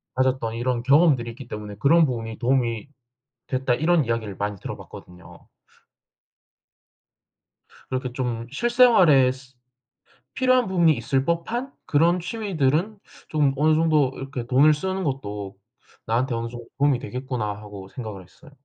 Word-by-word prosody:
가졌던 130 -3 0
이런 120 0 -1
경험들이 135 -4 +4
있기 125 +1 -11
때문에 105 -2 -7
"그런 160 +6 +5
부분이 115 -4 -4
도움이 120 -1 0 0.6
됐다." 130 -1 0
이런 160 +2 +2
이야기를 115 -4 -3
많이 105 0 -3
들어봤거든요. 90 0 -11 2.4
그렇게 130 -1 -3
좀 120 -3 -3
'실생활에 185 - +5
스 130 0 -14 0.8
필요한 255 -1 +3
부분이 170 -4 +3
있을 130 +3 -1
법한 225 - -2
그런 170 +4 +3
취미들은 185 - -1 0.3
좀 150 -3 +2
어느 155 +2 +3
정도 155 -4 +2
이렇게 135 -3 -6
돈을 140 +5 +5
쓰는 190 +4 -3
것도 105 - -4 0.5
나한테 120 +3 0
어느 115 0 -3
정도 120 0 -10
도움이 140 -2 +3
되겠구나.' 125 -2 -4 0.2
하고 100 -2 -10
생각을 105 -4 -8
했어요. 120 - -19
130 Hz, 320 characters per minute, -24 LUFS, 115-160 Hz, 2.4 s, 그런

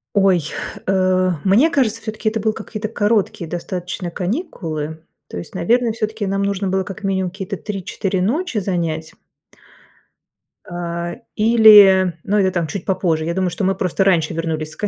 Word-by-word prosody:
Ой, 195 -3 +4 0.5
э, 185 -1 +2
мне 220 +12 +4
кажется, 230 -8 0
всё-таки 220 0 -2
это 220 +1 -3
был 220 +1 0
какие-то 215 0 -5
короткие 210 -5 0
достаточно 175 +1 -4
каникулы, 165 - -4 0.2
то - - -8
есть, 85 - -8
наверное, 230 +7 +1
всё-таки 220 -1 -3
нам 195 0 -1
нужно 200 0 -1
было 190 0 0
как 200 +3 -9
минимум 190 -2 0
какие-то 195 +1 -6
3-4 195 -1 -3
ночи 260 - -1
занять 165 -5 -2 1.5
а, 170 0 -4 0.2
или, 210 -5 +7
ну, 205 +2 0
это 190 -1 +2
там, 175 -3 -1
чуть 170 +3 -6
попозже. 175 -4 0
Я 170 - -1
думаю, 185 0 0
что 185 - -4
мы 190 +1 +2
просто 185 +1 0
раньше 175 -5 +2
вернулись 160 -1 -3
с - - -12
к 210 - -2
190 Hz, 160 wpm, -19 LUFS, 175-215 Hz, 1.5 s, или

